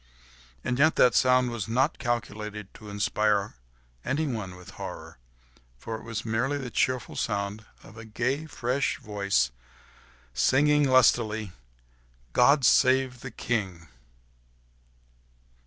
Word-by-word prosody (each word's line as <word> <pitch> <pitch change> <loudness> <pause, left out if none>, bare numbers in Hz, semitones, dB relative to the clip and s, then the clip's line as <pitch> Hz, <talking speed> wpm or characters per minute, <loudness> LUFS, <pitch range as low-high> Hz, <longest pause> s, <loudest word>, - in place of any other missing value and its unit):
And 125 +1 -2
yet 155 +3 +4
that 125 - +5
sound 125 -1 +3
was 115 -3 -4
not 130 +7 +1
calculated 105 -4 -4
to 105 - -12
inspire 100 0 0 0.5
anyone 120 -11 -2
with 90 0 -13
horror, - - -9 0.6
for 115 - -7
it 110 - -9
was 115 -1 -5
merely 125 +6 0
the 130 -4 -6
cheerful 130 +4 -1
sound 105 0 -3 0.2
of 110 - -15
a 115 - -9
gay, 130 +8 -2
fresh 130 0 -1
voice 100 - 0 0.8
singing 145 - +3
lustily, 110 -5 +3 0.8
"God 140 +1 +5
save 130 0 +3
the 135 - -7
King!" 95 -11 -3
115 Hz, 115 wpm, -27 LUFS, 105-130 Hz, 0.8 s, that